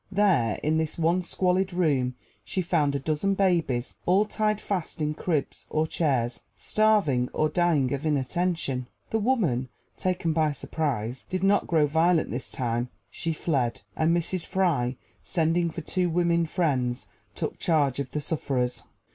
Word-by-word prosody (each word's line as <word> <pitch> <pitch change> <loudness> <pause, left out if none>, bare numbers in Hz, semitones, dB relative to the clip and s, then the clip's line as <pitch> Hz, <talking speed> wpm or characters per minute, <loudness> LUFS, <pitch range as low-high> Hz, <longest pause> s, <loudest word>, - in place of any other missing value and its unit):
There, 190 - +3
in 155 +1 +2
this 160 -1 -1
one 170 +2 +2
squalid 185 +1 0
room, 140 -8 +1 0.3
she 185 - -2
found 155 -5 +1
a - - 0
dozen 155 +8 0
babies, 165 -11 +1
all 190 +4 +4
tied 215 0 0
fast 190 -7 -3
in 150 0 0
cribs 155 -2 -2
or 155 0 +1
chairs, 130 -7 0
starving, 200 -13 +2
or 155 - +1
dying 155 -6 +2
of 140 +1 -3
inattention. 150 -2 -1 0.2
The 225 - +1
woman, 185 - +1 0.3
taken 180 -3 0
by 155 -2 +2
surprise, 130 -5 -2
did 185 0 -2
not 200 +1 +3
grow 160 -3 +3
violent 160 +3 +2
this 125 +4 -3
time: 120 -1 -2 0.2
she 165 - -2
fled, 140 -7 -1
and 160 0 +2
Mrs. 175 +1 -1
Fry, 160 -10 0 0.2
sending 170 +1 +1
for 165 +1 -6
two 180 +3 0
women 170 0 +2
Friends, 130 -8 0 0.3
took - - -4
charge 145 -6 +2
of 140 -2 -3
the 150 +3 -3
sufferers. 135 -5 -1
160 Hz, 155 wpm, -27 LUFS, 135-180 Hz, 0.3 s, all